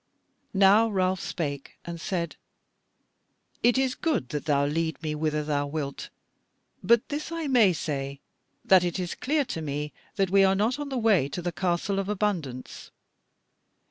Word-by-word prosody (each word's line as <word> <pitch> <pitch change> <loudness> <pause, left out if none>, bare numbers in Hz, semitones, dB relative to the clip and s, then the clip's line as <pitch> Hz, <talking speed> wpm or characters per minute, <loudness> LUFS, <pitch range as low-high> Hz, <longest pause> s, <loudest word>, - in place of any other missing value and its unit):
Now 200 +4 +6
Ralph 185 -2 +1
spake 140 -4 -4
and 170 -1 -6
said: 170 -4 -2 1.3
"It 240 +1 +4
is 265 -1 +2
good 275 - -1
that 145 +2 -4
thou 140 -2 +2
lead 160 +2 -1
me 155 -1 -1
whither 150 0 -1
thou 145 -1 -1
wilt; 140 -2 -4 0.7
but 235 +4 +3
this 300 +2 -4
I 330 -1 -3
may 245 -8 +5
say, 140 -4 -3 0.5
that 185 -2 +6
it 175 0 -1
is 180 -2 -3
clear 290 +1 0
to 165 - -4
me 150 0 -4 0.2
that 195 -3 +1
we 195 0 +6
are 190 0 +4
not 225 +8 +1
on 290 -1 -4
the 265 - -2
way 210 - +3
to 175 - -4
the 175 - -1
Castle 180 +3 -1
of 195 0 -3
Abundance." 180 -12 -3
180 Hz, 165 wpm, -27 LUFS, 150-210 Hz, 1.3 s, Now